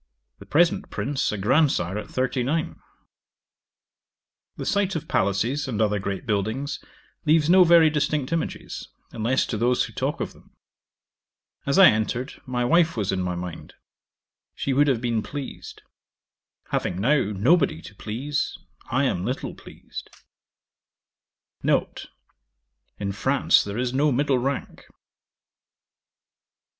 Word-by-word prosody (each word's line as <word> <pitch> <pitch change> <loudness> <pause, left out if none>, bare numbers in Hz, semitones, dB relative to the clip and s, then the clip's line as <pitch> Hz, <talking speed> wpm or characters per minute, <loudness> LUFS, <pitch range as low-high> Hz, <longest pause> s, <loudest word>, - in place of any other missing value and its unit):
The - - -13
present 165 +3 +2
Prince 140 -1 -1
a 105 - -3
grandsire 110 - +2
at 105 - -5
thirty 130 0 -1
nine. 155 +6 -1 1.8
'The - - -5
sight 200 -2 +1
of 160 0 -4
palaces, 115 +9 0
and 115 -5 -3
other 105 -2 +2
great 95 0 -4
buildings, 115 +7 -2 0.4
leaves 155 +1 +3
no 185 0 +8
very 165 -2 +6
distinct 150 -1 0
images, 165 - -4 0.2
unless 120 +4 +1
to 110 - -3
those 120 +3 +2
who - - -7
talk - - -2
of - - -4
them. - - -22 1.1
As 140 - +2
I 195 - +10
entered, 120 +5 -3
my 125 -1 -1
wife 165 0 +3
was 100 -3 0
in 95 -1 -1
my 90 -1 -2
mind: 90 -1 -7 0.8
she 140 - -1
would 145 +2 +4
have 130 -5 +1
been 115 -3 0
pleased. 140 +2 -8 0.9
Having 90 - -1
now 135 +7 +3
nobody 105 - +2
to - - -11
please, 125 +9 -3 0.3
I 130 +3 +1
am 90 -10 0
little 125 +6 -3
pleased. - - -10 1.5
'N. - - +3 1.1
In 100 -1 -3
France 135 +7 +3
there 100 +1 -5
is 125 0 -1
no 145 +3 +3
middle 135 0 +2
rank. 135 +2 -4
130 Hz, 130 wpm, -24 LUFS, 105-150 Hz, 1.8 s, I